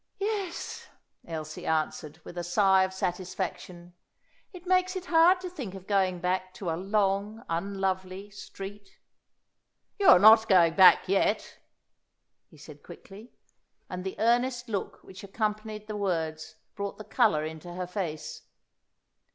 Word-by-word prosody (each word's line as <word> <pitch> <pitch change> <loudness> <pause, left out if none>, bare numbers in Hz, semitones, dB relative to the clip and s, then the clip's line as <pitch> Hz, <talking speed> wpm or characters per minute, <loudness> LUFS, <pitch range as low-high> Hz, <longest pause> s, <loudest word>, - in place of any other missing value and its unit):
"Yes," 400 -3 -4 0.4
Elsie 155 -2 -6
answered, 155 0 -2
with - - -11
a 175 - -4
sigh 190 +2 +3
of 190 0 0
satisfaction; 180 -1 -5 0.6
"it 360 -2 -12
makes 370 +1 +2
it 370 -1 -5
hard 350 +2 +5
to 370 - -5
think 265 - -7
of 190 -1 -10
going 190 -3 +1
back 185 +1 -2
to 180 -5 -4
a - - -1
'long, 200 +3 -1
unlovely 190 +2 -3
street.'" 200 0 -10 1.0
"You 395 - +2
are - - +10
not 220 +3 +7
going 170 -4 +5
back 190 0 +7
yet," 195 +3 0 0.9
he - - -19
said - - -13
quickly. 210 +5 -13 0.6
And 180 0 -5
the 190 - -5
earnest 240 +2 +1
look 200 -3 -4
which 190 +1 -12
accompanied 215 +1 -3
the 215 0 -6
words 160 -5 -3 0.2
brought 200 -1 -5
the 215 - -8
colour 155 -6 +2
into 160 +2 -8
her 180 +1 -4
face. 175 -4 -5
195 Hz, 140 wpm, -28 LUFS, 180-215 Hz, 1.0 s, are